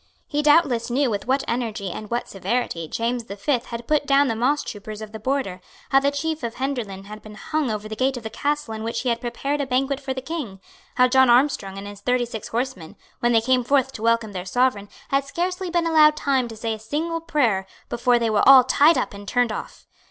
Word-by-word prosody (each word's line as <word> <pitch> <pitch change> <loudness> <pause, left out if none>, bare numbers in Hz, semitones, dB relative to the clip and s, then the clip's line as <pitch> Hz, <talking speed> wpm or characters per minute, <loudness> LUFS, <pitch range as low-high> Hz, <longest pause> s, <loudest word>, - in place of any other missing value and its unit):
He 295 0 -1
doubtless 290 -6 +3
knew 260 +1 +1
with 205 +2 -3
what 265 +2 +1
energy 220 -6 -2
and 215 - -7
what 240 +1 -2
severity 195 -4 -2
James 235 +5 -2
the 200 - -7
Fifth 245 +3 -1
had 235 0 -6
put 300 -1 +1
down 275 0 +4
the - - +1
mosstroopers 220 -4 -2
of 215 -1 -8
the 220 - -8
border, 220 -7 -2 0.3
how 270 - +6
the 280 +1 +2
chief 315 +2 -3
of 235 -2 -4
Henderland 240 -8 -4
had 210 +1 -10
been 215 -1 -12
hung 305 +4 -2
over 215 -1 -3
the 220 - -6
gate 260 +2 0
of 240 - -8
the 220 - -6
castle 290 -1 -2
in 220 - -6
which 225 +1 -3
he 255 - -1
had 235 0 -1
prepared 275 +4 -2
a 275 - -3
banquet 265 +2 0
for 270 -1 -5
the 260 - -3
King; 265 -11 -5 0.4
how 250 0 +5
John 260 0 +4
Armstrong 240 -6 +2
and 195 - -7
his 205 0 -9
thirty 250 +2 +1
six 225 -3 -7
horsemen, 230 -9 -4 0.2
when 240 - +2
they 225 -1 +4
came 255 +2 +2
forth 265 +1 +2
to 220 - -9
welcome 230 -1 +1
their 185 -2 -5
sovereign, 205 0 0 0.2
had 275 0 +2
scarcely 360 +5 -3
been 345 -1 +1
allowed 310 -2 +5
time 265 -3 +1
to 225 -1 -9
say 225 0 -2
a 220 - -7
single 320 +9 -3
prayer 245 - +1 0.2
before 240 +1 +2
they 230 -2 0
were 215 +4 +4
all 265 -2 +10
tied 290 +5 +4
up - - -2
and 200 0 -10
turned 245 0 +1
off. - - -7
245 Hz, 235 wpm, -23 LUFS, 220-280 Hz, 0.4 s, all